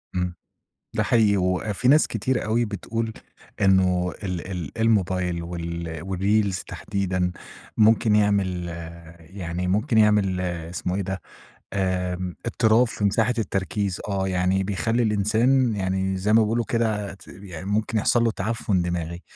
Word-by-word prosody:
إمم. 90 -1 -1 0.6
ده - - +2
حقيقي، 110 -3 +3
وفي 95 +5 0
ناس 150 +3 +6
كتير 125 +4 -1
أوي 115 +2 +1
بتقول 110 +2 -3 0.5
إنّه 95 -2 +3
ال 90 -1 -4
ال 90 -1 -5
الموبايل 95 -6 +1
وال 85 -1 -5
والreels 100 +1 +1
تحديدًا 95 -2 -2 0.4
ممكن 110 0 +4
يعمل 100 -4 +1 0.5
يعني 90 +1 -5
ممكن 105 +4 +2
يعمل 105 -4 +3
اسمه 90 0 -3
إيه 100 - -1
ده 95 0 -4 0.5
آمم، 90 -2 -1
اضطراب 115 +1 +3
في 110 - -4
مساحة 115 +4 +2
التركيز، 100 -2 -2
آه، 95 -1 -1
يعني 95 +1 +1
بيخلّي 105 +5 0
الإنسان 110 +4 +2
يعني 95 0 -1
زي 100 +3 0
ما 110 +1 +6
بيقولوا 115 +2 0
كده 110 -4 -1
ت 100 - -18
يعني 90 -3 -9
ممكن 105 +2 0
يحصل 120 +3 +3
له 115 - +3
تعفن 105 -3 -1
دماغي 85 0 -3
95 Hz, 135 wpm, -24 LUFS, 90-110 Hz, 0.6 s, ناس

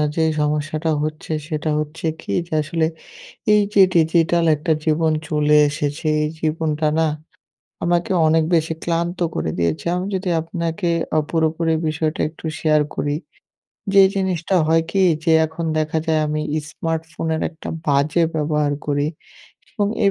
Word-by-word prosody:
যে 160 - +2 0.2
সমস্যাটা 150 +2 -1
হচ্ছে, 155 +1 -5 0.2
সেটা 155 0 -2
হচ্ছে 155 +2 -5 0.2
কি - - -6 0.2
যে - - -8
আসলে, 160 +1 0 0.7
এই 210 - +6
যে 195 - +7
ডিজিটাল 165 +1 +3
একটা 160 +2 0
জীবন 160 0 +2 0.2
চলে 150 0 +3
এসেছে 145 +2 -3 0.2
এই 150 - 0
জীবনটা 155 -1 0
না, 160 - +3 0.8
আমাকে 175 +1 +1 0.2
অনেক 160 0 +3
বেশি 160 0 +1
ক্লান্ত 170 +1 -1 0.2
করে 80 - -1
দিয়েছে। 85 - -1
আমি 185 +2 -2
যদি 185 0 -2
আপনাকে 170 +2 -3 0.3
অ - - +5
পুরোপুরি 160 0 +1 0.2
বিষয়টা 155 +1 -2
একটু 160 - -18 0.2
শেয়ার 155 -1 +3
করি, 145 0 -1 0.8
যে 195 -1 +8
জিনিসটা 190 -1 -1
হয় 165 0 +3
কি, 195 -1 +2 0.2
যে 165 - +3
এখন 160 +1 -6
দেখা 155 +1 0
যায় 160 -1 +2
আমি 150 0 -1 0.2
ইস্মার্টফোনের 160 +1 -3
একটা 160 - -10 0.2
বাজে 145 +4 +2
ব্যবহার 150 -1 0
করি 145 0 0 0.7
এবং 205 -2 0 0.2
এই 200 - +5
160 Hz, 145 wpm, -20 LUFS, 150-165 Hz, 0.8 s, যে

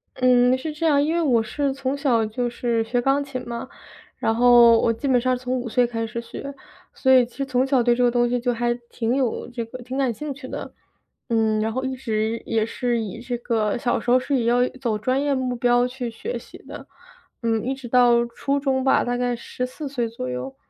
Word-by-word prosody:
嗯， 250 0 +4
是 305 +4 -5
这 315 +2 -3
样， 285 -3 +4
因 310 +2 0
为 340 - +1
我 245 -8 +3
是 280 +5 -1
从 270 0 -2
小 250 -6 +1
就 240 +3 -2
是 235 -1 -1
学 245 +2 -1
钢 275 +3 +2
琴 255 -3 -7
嘛， 235 +2 -5 0.5
然 225 - 0
后 240 -1 +7
我 230 - +2
基 230 +5 -4
本 250 -3 +3
上 255 0 +1
从 255 +1 -2
5 240 -1 -5
岁 245 +2 +3
开 230 -1 -3
始 235 +1 -5
学， 280 +4 -8 0.4
所 260 - +1
以 255 -2 +6
其 240 - -19
实 275 - -1
从 260 -1 +1
小 265 -3 +3
对 240 0 +3
这 250 - +1
个 245 - +5
东 240 0 +2
西 245 0 0
就 245 +1 0
还 240 +1 0 0.2
挺 230 +1 -1
有 260 -4 -1
这 240 -1 -4
个 240 +3 -9
挺 255 +2 -5
感 265 -3 +1
兴 290 +6 -5
趣 265 -1 -10
的。 - - -7 0.6
嗯， 220 -2 +2
然 220 - 0
后 260 +2 -2
一 265 0 -2
直 225 -3 -2
也 220 -1 0
是 240 +1 -1
以 220 +1 -6
这 245 0 -4
个 225 -2 0
小 240 0 0
时 - - -5
候 250 - +6
是 280 +2 -1
以 235 - -1
要 245 +1 +3
走 230 -5 0
专 255 +5 0
业 285 -1 +1
目 255 -1 -2
标 245 0 +3
去 250 -1 -5
学 415 - -5
习 - - -14
的， - - -11 0.6
嗯， 225 -2 0
一 265 +2 -1
直 265 -2 -9
到 240 -1 +4
初 275 +4 -2
中 265 -2 0
吧， 270 - +3
大 245 0 -1
概 245 0 0
14 255 +5 -6
岁 245 -4 -2
左 225 - -6
右。 125 +2 -5
245 Hz, 250 characters per minute, -23 LUFS, 235-260 Hz, 0.6 s, 后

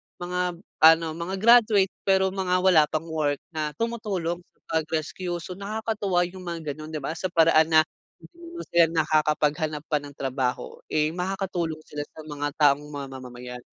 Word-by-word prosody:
mga 180 0 -2 0.2
ano, 165 +1 +7
mga 170 +4 -4
graduate, 215 -2 +5 0.2
pero 190 -1 +3
mga 190 -1 0
wala 180 -5 +6
pang 155 +2 -3
work 150 -3 0
na 155 -3 -3
tumutulong 200 -6 -2
sa - - -35 0.2
pag-rescue. 165 +3 -3
So, 185 - -8
nakakatuwa 200 -2 -1
yung 185 0 -10
mga 165 -3 -4
gano’n, 155 +2 -9
di - - -2
ba 140 - -2
sa 180 +3 -3
paraan 165 -2 +4
na 155 - +9 0.4
hindi 340 0 -10
sila 170 -1 +6 0.2
nakakapaghanap 155 0 +1
pa 150 - +1
ng 145 0 -10
trabaho, 130 -1 -2
eh, 155 0 +1
makakatulong 180 -3 -3
sila 150 0 -5
sa - - -10
mga 145 -1 -3
taong 145 -1 +4
mamamayan. 125 -3 -8
165 Hz, 155 wpm, -25 LUFS, 150-190 Hz, 0.4 s, na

